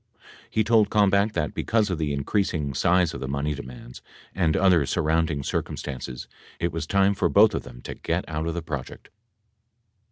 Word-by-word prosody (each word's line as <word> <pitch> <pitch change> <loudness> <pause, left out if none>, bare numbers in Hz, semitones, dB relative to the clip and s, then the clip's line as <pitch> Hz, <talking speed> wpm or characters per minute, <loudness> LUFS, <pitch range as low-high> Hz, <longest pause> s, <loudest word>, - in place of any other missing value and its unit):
He 110 - +1
told 110 -1 +4
Kalmbach 100 0 +3
that, 75 -5 -2
because 110 -3 0
of 85 - -2
the 75 -2 -1
increasing 75 0 -1
size 85 +4 +2
of - - -6
the 65 - -4
money 70 +2 -1
demands 65 -3 -10 0.3
and 85 -4 +1
other 90 -5 +4
surrounding 80 -2 0
circumstances, 65 -2 -4 0.3
it 85 - 0
was 80 -1 -4
time 100 +1 +3
for 100 - 0
both 105 +2 +5
of - - -2
them - - -12
to - - -6
get - - -3
out 80 0 -3
of 85 - -2
the 85 - -3
project. 75 -5 -7
80 Hz, 180 wpm, -25 LUFS, 70-100 Hz, 0.3 s, both